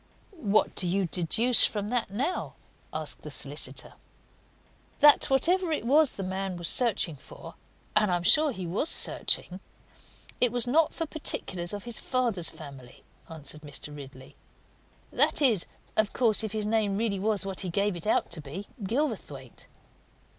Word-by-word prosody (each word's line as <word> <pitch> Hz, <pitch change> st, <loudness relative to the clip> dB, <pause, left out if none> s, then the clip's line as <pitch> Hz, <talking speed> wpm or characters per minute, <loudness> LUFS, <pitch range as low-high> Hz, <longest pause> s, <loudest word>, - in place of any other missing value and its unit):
"What 215 Hz, -, +1 dB
do 185 Hz, -, +2 dB
you 190 Hz, +2 st, 0 dB
deduce 190 Hz, +9 st, +5 dB
from 205 Hz, -1 st, +1 dB
that, 245 Hz, -4 st, -1 dB
now?" 270 Hz, -, -3 dB, 0.4 s
asked -, -, -3 dB
the -, -, -9 dB
solicitor. -, -, -2 dB, 1.1 s
"That 295 Hz, 0 st, +6 dB
whatever 335 Hz, +6 st, +2 dB
it 305 Hz, -, -2 dB
was 290 Hz, +3 st, +4 dB
that 195 Hz, -, -6 dB
the -, -, -4 dB
man 190 Hz, -1 st, -4 dB
was 175 Hz, -1 st, -3 dB
searching 210 Hz, -, +1 dB
for 130 Hz, -, -12 dB, 0.4 s
and 210 Hz, -, +3 dB
I 180 Hz, -, +2 dB
am 175 Hz, -, -3 dB
sure 300 Hz, -, +4 dB
he 190 Hz, -7 st, -6 dB
was 200 Hz, -, -2 dB
searching 185 Hz, +1 st, 0 dB, 0.8 s
it 245 Hz, -2 st, +3 dB
was 245 Hz, -1 st, -1 dB
not 305 Hz, +6 st, +2 dB
for 330 Hz, -, -2 dB
particulars 185 Hz, -, -3 dB
of 205 Hz, -1 st, -6 dB
his 235 Hz, -2 st, -6 dB
father's 235 Hz, -10 st, -1 dB
family," 135 Hz, -5 st, -12 dB, 0.3 s
answered 155 Hz, -2 st, -8 dB
Mr. 145 Hz, 0 st, -8 dB
Ridley. 135 Hz, -2 st, -12 dB, 0.8 s
"That -, -, +3 dB
is, 235 Hz, -, +2 dB, 0.3 s
of 215 Hz, -1 st, +1 dB
course, 225 Hz, -4 st, +2 dB
if 215 Hz, -, -4 dB
his 215 Hz, -1 st, -2 dB
name 210 Hz, -2 st, 0 dB
really 210 Hz, -3 st, -1 dB
was 205 Hz, 0 st, 0 dB
what 195 Hz, -1 st, -4 dB
he 185 Hz, -, -2 dB
gave 200 Hz, +2 st, 0 dB
it 170 Hz, +3 st, -6 dB
out -, -, +1 dB
to 170 Hz, -2 st, -4 dB
be 155 Hz, +8 st, -8 dB, 0.2 s
Gilverthwaite." 195 Hz, -, -4 dB
205 Hz, 165 wpm, -27 LUFS, 175-245 Hz, 1.1 s, That